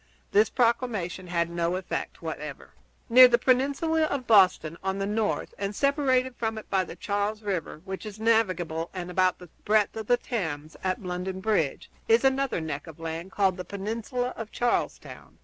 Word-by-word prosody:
This 210 +2 +4
proclamation 230 -7 0
had 170 -1 0
no 170 +1 -1
effect 185 -2 -4
whatever. 150 -3 -6 0.4
Near 255 +2 +9
the 240 -1 +4
peninsula 280 +6 +2
of 280 -4 -3
Boston, 185 -7 +4
on 190 0 -1
the 195 - -1
north, 210 +1 -1
and 200 +1 -3
separated 260 -2 +2
from 225 -1 -2
it 215 - -8
by 190 -1 +3
the - - -9
Charles 205 +1 -2
River, 180 -5 -3
which 190 -1 -6
is 215 -1 -8
navigable 185 -8 +1
and 180 -1 -5
about 185 0 +2
the 180 -2 -13
breadth 210 -1 +2
of 220 -2 -5
the 245 - +4
Thames 160 - -4
at 185 +1 -1
London 180 +1 -4
Bridge, 190 -9 0 0.2
is 230 +2 +4
another 270 -4 +2
neck 155 -1 -5
of 165 -1 -11
land 165 +3 -5
called 195 -2 +1
the 180 - -4
Peninsula 225 +6 -3
of 225 -1 -7
Charlestown. 245 0 -2
200 Hz, 175 wpm, -27 LUFS, 180-235 Hz, 0.4 s, Near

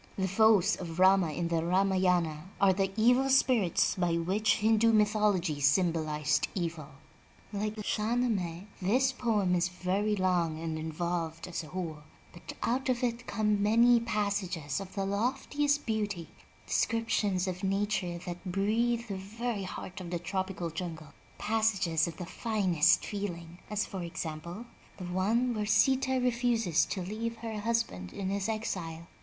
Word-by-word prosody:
The 190 -1 0
foes 210 0 +4
of 165 -2 -7
Rama 185 -3 +5
in 170 +2 -2
the 165 -1 0
Ramayana 180 -3 +1
are 195 -2 +5
the 195 0 0
evil 250 +4 +4
spirits 250 -9 +3
by 175 -3 0
which 200 +6 +1
Hindu 225 +1 +3
myth 210 -1 +3
ology 185 -8 +1
symbolized 155 -1 +2
evil. 165 -5 -3 0.7
Like 210 +1 -2
the 215 - -6
Shah 215 +3 0
Nameh, 195 -8 -1 0.2
this 255 +8 +2
poem 215 -7 0
is 180 0 +2
very 190 +4 -1
long 175 -4 +1
and 160 -1 -3
involved 165 +1 -3
as 175 -2 -4
a - - -10
whole, 165 -3 -5 0.3
but 175 - -9
out 260 +3 0
of 250 -1 0
it 240 0 -2
come 210 -1 +1
many 235 +3 +5
passages 200 - -2
of 190 -1 -9
the 195 -1 -1
loftiest 270 +8 0
beauty 205 -6 -2 0.2
— - - -29
descriptions 210 -5 0
of 185 0 -4
nature 195 -2 0
that 175 -1 -6
breathe 220 +5 0
the 200 -3 -4
very 210 +1 -4
heart 185 +1 -7
of 175 - -7
the 175 - -2
tropical 185 -1 -3
jungle, 160 -3 -6 0.2
passages 195 -7 +1
of 165 - -7
the 180 - -5
finest 190 -6 +2
feeling, 175 -4 -5
as 210 0 -1
for 190 - -6
example, 170 +4 -6 0.3
the 185 - -6
one 215 +8 +1
where 210 -2 -2
Sita 260 +3 +3
refuses 235 -8 +2
to 185 - -4
leave 225 +5 -4
her 225 -2 -5
husband 205 - -1
in 190 -1 -3
his 200 +2 -1
exile. 170 -7 -4
195 Hz, 155 wpm, -30 LUFS, 175-220 Hz, 0.7 s, Rama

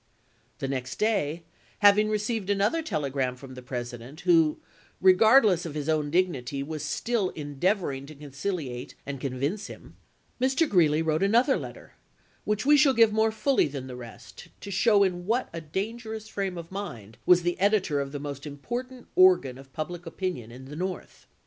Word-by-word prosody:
The 135 - -3
next 130 -2 -3
day, 175 -7 0 0.3
having 210 +1 +5
received 215 -1 -2
another 205 +10 +2
telegram 140 - -2
from 130 0 -11
the 130 - -9
President, 125 +3 -7
who, 165 -4 +4 0.4
regardless 195 0 +5
of 160 -3 -6
his 150 -1 -3
own 155 -2 +1
dig 180 +4 +3
nity, 140 -3 -5
was 155 0 -5
still 200 +6 -1
endeavoring 145 -1 -1
to 155 - -11
conciliate 140 -2 -5
and 140 -2 -6
con 135 -2 -3
vince 155 +11 -2
him, - - -12 0.5
Mr. 265 +5 +2
Greeley 160 - +3
wrote 155 0 0
another 235 +7 +4
letter, - - -8 0.5
which 210 +2 -1
we 295 +1 +6
shall 285 -2 +5
give 225 -2 +5
more 220 0 +3
fully 265 - +2
than 140 -2 -6
the 130 -1 -8
rest, 120 -2 -11
to 200 - -7
show 205 +1 +4
in 180 -2 -2
what 240 +4 0
a 165 - -5
dangerous 220 +6 -5
frame 195 -4 -3
of 170 0 -8
mind 120 - -7
was 180 -1 +6
the 175 +1 -1
editor 195 -7 +2
of 135 0 -5
the 145 - -5
most 145 0 -6
important 245 - -6
organ 365 - +4
of 135 0 -15
public 170 +4 -6
opinion 165 - -4
in 130 +2 -11
the 145 +3 -9
North. 185 +3 -6
175 Hz, 175 wpm, -27 LUFS, 140-210 Hz, 0.5 s, we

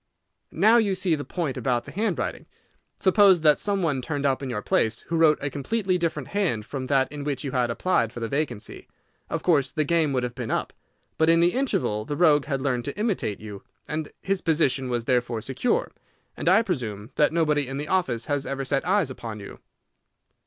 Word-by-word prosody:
"Now 215 +7 +5
you 205 -4 +2
see 185 -2 0
the 145 -2 -1
point 160 -6 -3
about 120 -3 0
the - - -9
handwriting. 195 - -2 0.5
Suppose 190 -2 +5
that 150 -2 +5
some 200 -2 0
one 145 -6 0
turned 145 +1 -3
up 135 -1 +1
in 135 - -4
your 105 -4 -3
place 110 +1 +1
who 165 - -4
wrote 160 -2 +5
a 145 - -2
completely 185 - -1
different 155 -5 -2
hand 160 - -1
from 135 +1 -5
that 135 0 +1
in 145 -1 -6
which 145 +1 -2
you 140 - -3
had 125 -2 +1
applied 115 -3 +1
for 120 - -8
the 115 - -2
vacancy, 135 -5 -4 0.4
of 165 - -3
course 145 -7 +2
the 155 - 0
game 160 -1 +2
would 130 -2 0
have 125 -1 -3
been 120 -2 -5
up. - - -2 0.5
But 160 0 +4
in 165 0 +5
the 175 +1 +3
interval 195 - 0
the 145 +6 -4
rogue 150 -5 +4
had 135 -2 -2
learned 125 -4 -1
to 140 - -5
imitate 205 - -1
you, 105 -2 -8 0.3
and 155 0 -3
his 195 -1 0
position 145 -5 +1
was 120 -2 -2
therefore 125 -2 0
secure, 190 - -1 0.4
as - - -5
I 225 - +6
presume 115 - -4
that 150 - +3
nobody 150 -4 +1
in 135 +1 -5
the 145 +1 -4
office 135 -11 0
had 145 -1 -1
ever 135 0 -3
set 135 +1 0
eyes 185 -7 +2
upon 115 -4 -7
you." 100 - -10
145 Hz, 210 wpm, -25 LUFS, 125-170 Hz, 0.5 s, I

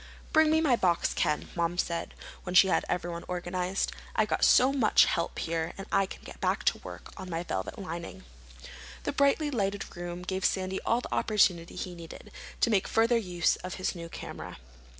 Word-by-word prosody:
"Bring 315 -1 +6
me 315 +1 +4
my 280 -6 +4
box, 175 -6 +1
Ken," 150 - 0
Mom 170 0 0
said, 170 -2 -2 0.3
when 180 0 -5
she 190 +1 +8
had - - +2
everyone 175 -1 -2
organized. 180 +1 -2 0.2
"I've 215 -1 +2
got - - 0
so 260 +2 +6
much 240 -6 +5
help 170 -2 -1
here 165 0 -2 0.2
I 195 -1 +3
can - - -10
get - - -11
back - - 0
to - - +2
work - - -10
on 185 - -7
my 165 0 -2
velvet 95 - -4
lining." 170 -3 -6 0.8
The - - -1
brightly 280 +2 +2
lighted 205 -5 -2
room 175 0 -6
gave 190 +1 -3
Sandy 190 0 0
all 235 +2 +3
the - - -6
opportunity 180 -6 +2
he 180 - -5
needed 170 -2 -11 0.3
to - - +4
make 195 -3 +2
further 230 +2 +3
use 180 -6 +1
of 185 0 -6
his 185 - -1
new 170 -2 -8
camera. - - -8
185 Hz, 190 wpm, -29 LUFS, 175-215 Hz, 0.8 s, she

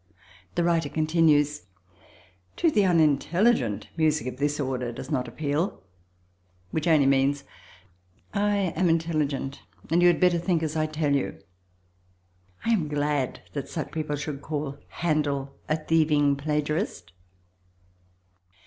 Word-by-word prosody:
The 175 - +2
writer 165 -3 +1
continues: 155 -3 +2 0.9
"To 330 - +2
the 205 -7 +3
unintelligent, 160 - +2
music 155 -5 +1
of 130 0 -5
this 145 +2 0
order 130 -3 -2
does 130 +4 -8
not 125 -4 0
appeal"; 145 - -2 0.9
which 160 +1 -1
only 155 -4 +5
means 135 +1 +2 0.9
"I 200 -3 +1
am 175 +1 +2
intelligent 155 -4 -1 0.3
and 170 +2 +4
you 175 - +6
had 175 -2 +4
better 180 -2 +4
think 170 -1 0
as 155 0 -2
I 155 0 +1
tell 155 -2 0
you." 140 - -2 1.3
I 230 - +2
am 185 -9 +2
glad 145 -2 -1
that 140 - -4
such 160 - -4
people 155 -2 -2
should 145 -1 -5
call 145 -2 -4
Handel 145 -4 -1
a 155 - +3
thieving 155 -3 +2
plagiarist. 150 - -2
150 Hz, 130 wpm, -26 LUFS, 140-165 Hz, 1.3 s, you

